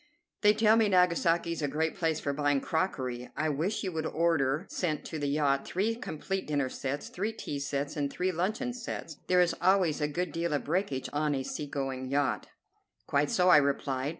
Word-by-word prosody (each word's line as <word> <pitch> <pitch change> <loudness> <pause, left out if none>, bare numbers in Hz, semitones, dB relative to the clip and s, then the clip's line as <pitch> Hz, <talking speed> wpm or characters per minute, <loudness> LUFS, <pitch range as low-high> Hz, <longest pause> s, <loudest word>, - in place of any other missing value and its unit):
"They 210 0 +5
tell 220 0 +5
me 220 -2 +4
Nagasaki 170 -2 +3
is 165 - -3
a 145 - +1
great 155 +3 -1
place 160 -3 0
for 140 - -2
buying 145 -1 +2
crockery. 130 -7 -2
I 155 +1 +1
wish 165 +11 -1
you 190 - -2
would 160 -1 -2
order 160 -1 +1
sent 155 -5 -2
to 160 - -5
the 145 - -1
yacht 140 -1 +1
three 205 +5 0
complete 195 -4 -4
dinner 145 -3 0
sets, 135 +2 -4
three 205 +5 -2
tea 150 -10 -5
sets, 140 +1 -2
and 145 -2 -1
three 185 +1 0
luncheon 215 +9 -1
sets. 225 - -6
There 180 0 +5
is 175 - +3
always 180 -4 +3
a 150 - +2
good 175 +3 -2
deal 165 -1 -1
of 145 - 0
breakage 160 -5 -1
on 150 0 +1
a 135 - -2
sea 145 +2 -4
going 135 -2 -3
yacht." 140 0 0 0.6
"Quite 145 +1 +1
so," 180 0 +3
I 180 - +9
replied. 140 -1 0
155 Hz, 205 wpm, -30 LUFS, 140-180 Hz, 0.6 s, I